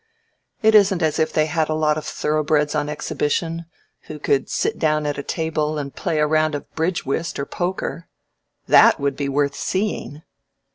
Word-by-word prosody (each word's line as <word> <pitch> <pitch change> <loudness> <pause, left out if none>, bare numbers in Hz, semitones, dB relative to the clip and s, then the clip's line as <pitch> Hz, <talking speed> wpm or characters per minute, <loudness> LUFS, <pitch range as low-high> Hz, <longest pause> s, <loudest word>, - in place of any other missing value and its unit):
It 220 0 +5
isn't 195 -4 +5
as 155 0 +1
if 160 - +1
they 155 - +2
had 160 -1 -1
a 155 - 0
lot 155 -1 +2
of 155 0 -5
thoroughbreds 150 -1 0
on 150 -1 -1
exhibition 165 +3 -2 0.4
who 155 - -7
could 140 -2 0
sit - - -1
down 155 -1 +1
at 145 -1 -2
a - - -1
table 155 0 -2
and 140 -2 -5
play 165 -4 -2
a 150 - +3
round 155 0 +1
of 145 - -6
bridge 165 +2 -1
whist 160 +5 -2
or 140 - -2
poker. 175 -1 -4 0.6
That - - +6
would 140 -1 -1
be 140 -1 -2
worth 140 0 +1
seeing. 185 -5 -3
155 Hz, 185 wpm, -21 LUFS, 145-165 Hz, 0.6 s, That